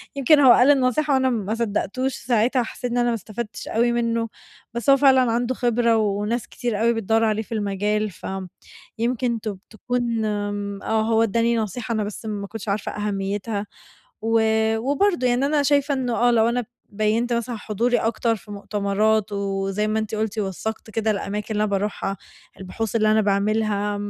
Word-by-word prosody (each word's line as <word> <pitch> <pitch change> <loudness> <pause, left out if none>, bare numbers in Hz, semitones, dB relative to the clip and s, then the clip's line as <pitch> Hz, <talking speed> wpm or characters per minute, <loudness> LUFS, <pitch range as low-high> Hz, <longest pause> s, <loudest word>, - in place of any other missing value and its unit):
يمكن 280 +2 +5
هو 265 -3 +8
قال 250 +4 +6
النصيحة 280 +2 +2
وأنا 260 -1 +3
ما 215 -4 -1
صدقتوش 235 +3 -1
ساعتها، 240 +1 +1
حسيت 245 +2 -5
إن 245 - -1
أنا 240 0 +2
ما 235 - +1
استفدتش 220 +1 -7
أوي 235 +2 +2
منه، 230 -1 0 0.4
بس 235 +3 -2
هو 275 - +7
فعلًا 260 -3 +5
عنده 240 +2 0
خبرة، 235 -1 +2
وناس 210 +2 -1
كتير 230 -4 -3
أوي 235 +1 +3
بتدوّر 225 0 +1
عليه 215 -1 +1
في - - -25
المجال. 210 +1 -1
فآمم، 190 0 -6 0.5
يمكن 235 0 0
ت 215 - -3 0.2
تكون 235 0 -2
آمم، 205 -1 -3
هو 220 +1 +2
اداني 230 +2 +1
نصيحة، 225 +2 -3
أنا 215 -1 0
بس 205 +2 -7
ما 205 -2 -4
كنتش 220 0 -7
عارفة 200 +1 -2
أهميتها، 205 +1 -3 0.6
و 225 +1 +2 0.4
وبرضو 285 - +1
يعني 250 +2 +2
أنا 295 0 +2
شايفة 285 0 +2
إنه 250 -3 -1
آه، 245 +1 +3
لو 230 0 +3
أنا 245 +1 0 0.3
بيّنت 215 +3 +1
مثلًا 235 0 -2
حضوري 235 +4 0
أكتر 225 +1 0
في 210 0 -13
مؤتمرات، 205 +1 0
وزي 195 +1 -1
ما 215 +1 0
أنتِ 220 0 -3
قُلتِ 215 0 -2
وثقت 215 +3 -4
كده 220 0 0
الأماكن 205 0 -3
اللي 210 0 +1
أنا 210 - -1
باروحها، 195 0 -2 0.4
البحوث 205 +4 -4
اللي 215 -1 +3
أنا 220 - +4
باعملها، 205 0 0
220 Hz, 175 wpm, -23 LUFS, 210-240 Hz, 0.6 s, هو